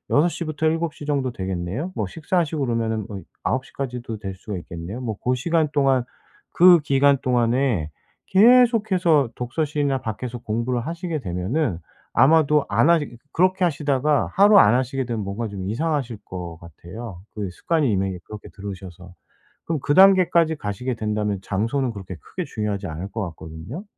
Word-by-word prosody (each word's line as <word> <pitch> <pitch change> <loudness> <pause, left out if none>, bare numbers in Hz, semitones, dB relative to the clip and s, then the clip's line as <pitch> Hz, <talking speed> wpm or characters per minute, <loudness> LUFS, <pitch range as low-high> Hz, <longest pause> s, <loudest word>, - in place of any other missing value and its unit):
여섯 150 +4 +5
시부터 160 -2 -2
7:00 160 -2 -2
정도 140 -3 0
되겠네요. 95 - -4
뭐 105 - -2
식사하시고 160 - -1
그러면은 115 -3 -1
뭐 100 -2 -6 0.2
9:00 130 0 -2
까지도 125 -4 -5
될 95 -2 -6
수가 100 +1 -6
있겠네요. 85 +8 -7
뭐 115 -4 -3
고 125 +5 -1
시간 160 +3 +1
동안 135 -3 +3 0.5
그 175 0 +7
기간 140 -1 +3
동안에 120 - +1 0.4
계속해서 205 - +4
독서실이나 140 +1 -1
밖에서 120 +3 -5
공부를 120 +2 -2
하시게 165 -1 -3
되면은 95 - -2 0.3
아마도 150 +2 +4
안 165 - +3
하니 145 -8 +1 0.2
그렇게 185 +2 +2
하시다가 150 -3 +1
하루 205 +1 +6
안 105 - +6
하시게 130 +1 -1
되면 115 -4 -3
뭔가 100 +4 -4
좀 95 -2 -6
이상하실 135 -1 -1
것 90 -3 -7
같아요 90 +4 -10
그 100 -3 -3
습관이 150 - 0
이미 95 -2 -1
그렇게 105 -1 -10
들으셔서. 95 -3 -9 0.5
그럼 165 -2 -1
그 145 - +1
단계까지 180 -4 +5
가시게 125 0 -4
된다면 105 -2 -2
장소는 115 +7 -1
그렇게 95 -4 -8
크게 - - -6
중요하지 105 -2 -3
않을 85 +5 -6
것 110 - -3
같거든요? 80 - -9
125 Hz, 355 characters per minute, -23 LUFS, 100-155 Hz, 0.5 s, 그